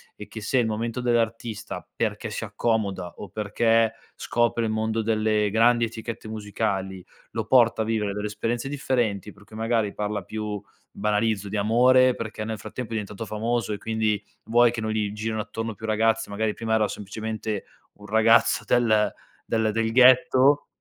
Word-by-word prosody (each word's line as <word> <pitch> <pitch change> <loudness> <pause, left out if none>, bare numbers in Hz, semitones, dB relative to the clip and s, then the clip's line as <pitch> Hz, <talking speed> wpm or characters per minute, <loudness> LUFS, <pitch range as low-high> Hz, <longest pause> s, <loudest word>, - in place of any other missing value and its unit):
e - - -10
che 110 - -8
se 130 +5 +1
il 120 - +2
momento 115 +2 -2
dell'artista, 115 -2 -2
perché - - -2
si - - -4
accomoda 100 -6 -1
o 105 - -8
perché 115 +2 +2 0.2
scopre 120 0 0
il - - -1
mondo 110 +1 0
delle 110 -1 +1
grandi 115 +3 +4
etichette 115 0 -7
musicali, 100 -3 -3 0.3
lo 115 -2 -3
porta 115 -1 +4
a - - 0
vivere 105 -3 -1
delle 105 +1 -3
esperienze 115 +5 -3
differenti, 120 -8 -1
per 105 0 -19
cui 110 - -14
magari 110 -2 0
parla 105 0 -2
più, 105 +1 -4 0.3
banalizzo, 105 -1 0
di 105 - -3
amore, 125 +4 +5
perché 110 -2 -5
nel 110 -1 -4
frattempo 125 +3 -6
è - - -3
diventato 105 0 -4
famoso 110 0 -1
e 100 - -5
quindi, 110 -2 -1 0.2
vuoi 120 +2 +5
che 120 - -4
non 110 0 -2
gli 105 -2 -1
girino 110 +1 -3
attorno 115 +1 -4
più 110 +2 -8
ragazze, 110 +1 +1
magari 105 +1 -1
prima 110 0 -1
era 110 -1 +2
semplicemente 110 +1 -4 0.3
un 105 - -15
ragazzo 110 +2 +4
del 110 -4 +3 0.3
del 110 -1 +1
del 110 +1 0
ghetto 130 +3 +5
110 Hz, 170 wpm, -25 LUFS, 105-115 Hz, 0.3 s, amore